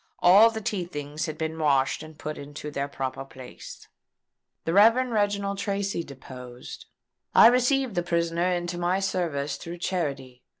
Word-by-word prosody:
All 200 +6 +7
the 220 -1 -5
tea 205 -4 -2
things 150 -2 -5
had 155 0 -5
been 160 0 -3
washed 140 -3 +2
and 155 -1 -11
put 155 0 -6
into 145 +1 -8
their 140 0 -2
proper 135 -1 -4
place." 130 -2 -12 0.8
The 165 - 0
Rev. 215 +4 +7 0.2
Reginald 200 -2 0
Tracy 200 -3 -2
deposed: 125 -3 -10 0.5
"I - - +9
received 250 +1 +4
the 175 - 0
prisoner 170 +1 0
into 175 0 -2
my 175 +2 +1
service 160 -7 -2
through 170 +2 -8
charity. 140 -8 -3
170 Hz, 155 wpm, -26 LUFS, 140-195 Hz, 0.8 s, I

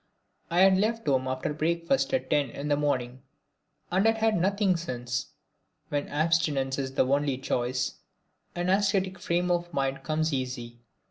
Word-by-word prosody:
I 175 +2 +3
had 190 0 +6
left 225 +2 0
home 130 -3 +1
after 130 +3 -2
breakfast 170 - 0
at 265 - -1
ten 145 -3 +2
in 140 +5 -5
the 145 - +4
morning, 130 -3 -1 0.7
and 190 +4 +3
had 225 0 +3
had 220 -1 +2
nothing 195 +1 +2
since. 125 -7 -3 0.6
When 145 -1 -1
abstinence 150 -4 +1
is 135 -1 -4
the - - +3
only 140 0 +1
choice, 130 -1 -2 0.6
an 175 +1 0
ascetic 195 -1 +1
frame 175 +1 0
of 175 0 -1
mind 135 -3 -1
comes 155 0 -1
easy. 125 -3 -4
155 Hz, 155 wpm, -28 LUFS, 130-185 Hz, 0.7 s, had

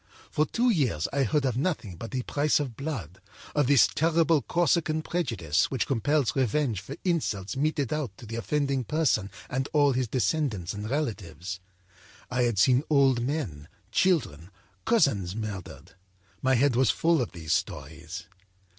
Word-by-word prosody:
For 155 0 +1
two 240 +1 +2
years 125 - +1
I 140 - +1
heard 135 +3 +1
of 125 -4 0
nothing 130 - -2
but 115 +7 -7
the 130 -2 -3
price 145 +4 +1
of 135 -6 -4
blood, 115 - -5 0.3
of 145 -3 +2
this 140 -2 +6
terrible 165 -1 +2
Corsican 165 -2 +1
prejudice 110 - 0
which 130 - -1
compels 135 +2 +1
revenge 130 -5 +1
for 95 - -8
insults 135 - -1
meted 145 -1 0
out 140 -10 -3
to - - -11
the 115 +1 -6
offending 135 +4 0
person 130 -8 +1 0.2
and 130 +2 -2
all 145 -2 +4
his 125 -1 0
descendants 120 - -1
and 105 +1 -5
relatives. 95 - -3 0.7
I 125 0 +1
had 120 -4 +1
seen 125 +6 +5
old 135 -5 +4
men, 120 - -3 0.2
children, 115 - +1 0.4
cousins 110 - +2
murdered; 100 -4 -6 0.5
my 130 0 +3
head 130 +1 +3
was 130 -1 +3
full 165 -3 +2
of 120 - -4
these 80 -3 -2
stories. - - -4
130 Hz, 155 wpm, -27 LUFS, 105-150 Hz, 0.7 s, this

